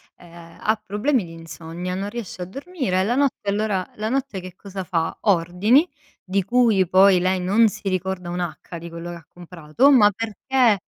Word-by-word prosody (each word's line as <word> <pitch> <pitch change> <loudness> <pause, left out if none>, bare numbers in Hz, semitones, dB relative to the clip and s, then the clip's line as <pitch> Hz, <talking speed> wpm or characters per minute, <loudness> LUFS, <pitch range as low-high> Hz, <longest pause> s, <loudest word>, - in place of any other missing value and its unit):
ehm, 170 -1 -15
ha 215 0 0
problemi 220 +4 0
di 165 - -11
insonnia, 165 +2 -7
non 200 +2 -3
riesce 225 -5 -7
a - - -3
dormire 265 - -3
e - - +2
la 235 +5 0
notte 270 -7 0
allora 205 -2 -1
la 215 +1 -3
notte 265 -6 -2
che 185 -1 -10
cosa 195 -1 -7
fa, 165 -3 -2
ordini, 200 - +3 0.4
di 195 +1 0
cui 215 -3 +3
poi 190 0 +6
lei 185 +1 +1
non 205 +5 +4
si 210 +1 -10
ricorda 185 -1 -3
un'acca 175 -1 -5
di 170 +1 -8
quello 170 +1 -7
che - - -7
ha 165 - -16
comprato, 175 - 0
ma 210 -6 +6
perché 225 +2 +1
190 Hz, 185 wpm, -22 LUFS, 175-220 Hz, 0.4 s, poi